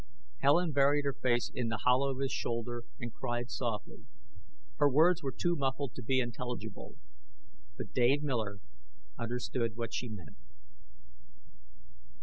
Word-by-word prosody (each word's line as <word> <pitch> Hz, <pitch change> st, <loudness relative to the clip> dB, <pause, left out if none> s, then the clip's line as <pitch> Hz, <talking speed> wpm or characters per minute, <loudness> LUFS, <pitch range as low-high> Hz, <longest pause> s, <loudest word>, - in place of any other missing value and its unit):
Helen 160 Hz, +5 st, +4 dB
buried 145 Hz, +1 st, +4 dB
her 140 Hz, -, +1 dB
face 120 Hz, -2 st, +1 dB
in 125 Hz, -2 st, -1 dB
the 115 Hz, -, -2 dB
hollow 130 Hz, +2 st, +4 dB
of 135 Hz, -, -2 dB
his 135 Hz, -, 0 dB
shoulder 120 Hz, 0 st, -2 dB
and 120 Hz, -3 st, -5 dB
cried 120 Hz, -1 st, -3 dB
softly. 110 Hz, -5 st, -3 dB, 0.7 s
Her 145 Hz, -, +5 dB
words 160 Hz, +5 st, +5 dB
were 135 Hz, -, -2 dB
too 175 Hz, +6 st, 0 dB
muffled 135 Hz, -2 st, -1 dB
to -, -, -7 dB
be 130 Hz, +3 st, +2 dB
intelligible. 120 Hz, 0 st, -4 dB, 0.8 s
But -, -, -6 dB
Dave 130 Hz, +4 st, +4 dB
Miller 110 Hz, -8 st, -1 dB, 0.6 s
understood 120 Hz, -1 st, -1 dB
what 115 Hz, -1 st, -3 dB
she 125 Hz, -, -2 dB
meant. 90 Hz, -9 st, -9 dB
125 Hz, 135 wpm, -33 LUFS, 120-140 Hz, 0.8 s, Her